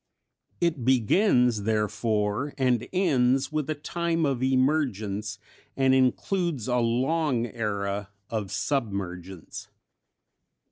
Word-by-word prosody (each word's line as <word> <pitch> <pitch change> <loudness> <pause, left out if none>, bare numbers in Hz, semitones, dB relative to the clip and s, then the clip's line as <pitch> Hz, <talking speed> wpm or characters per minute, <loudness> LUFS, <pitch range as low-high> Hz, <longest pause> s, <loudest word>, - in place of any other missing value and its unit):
It 165 -7 0
begins, 125 - +3
therefore, 105 +3 -1
and 125 -3 +1
ends 135 -8 +2
with 155 -1 -2
a 155 - 0
time 165 +2 -1
of 135 -3 -1
emergence, 125 -7 0 0.4
and 135 -1 +4
includes 130 - +1
a 125 -1 +1
long 125 +2 +1
era 100 -3 -3 0.2
of 105 -4 -4
submergence. 95 - -4
125 Hz, 95 wpm, -26 LUFS, 105-145 Hz, 0.4 s, and